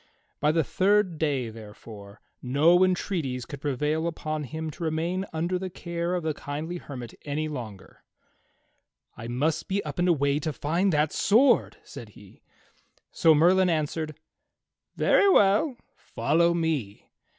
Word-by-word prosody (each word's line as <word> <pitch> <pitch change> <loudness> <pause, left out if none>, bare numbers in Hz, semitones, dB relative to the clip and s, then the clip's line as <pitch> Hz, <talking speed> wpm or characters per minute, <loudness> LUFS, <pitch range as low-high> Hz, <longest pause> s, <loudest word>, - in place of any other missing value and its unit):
By 150 - +3
the 165 0 +2
third 190 -1 +1
day, 135 -7 -1
therefore, 105 -1 -12 0.2
no 155 +8 +4
entreaties 165 -9 -1
could 140 +2 -9
prevail 150 +3 -1
upon 155 -2 -4
him 160 +3 -5
to 170 - -9
remain 165 +4 -2
under 170 +3 -2
the 190 0 -4
care 170 0 -3
of 175 - -3
the 155 -1 -1
kindly 150 +5 -5
hermit 125 -8 -9
any 150 +2 -2
longer. 115 -10 -8 1.1
"I 115 - -8
must 140 +6 -1
be 200 -1 -2
up 150 +2 -6
and 180 +1 +2
away 140 -3 +2
to 155 +1 -3
find 170 +8 0
that 150 -1 +1
sword," 235 +7 +3
said - - -10
he. - - -17 0.7
So 160 -2 +4
Merlin 180 +4 +4
answered: 155 -1 -2 0.8
"Very 400 - +4
well. 215 - +3 0.2
Follow 165 +8 +1
me." 155 -12 -3
155 Hz, 140 wpm, -26 LUFS, 140-175 Hz, 1.1 s, no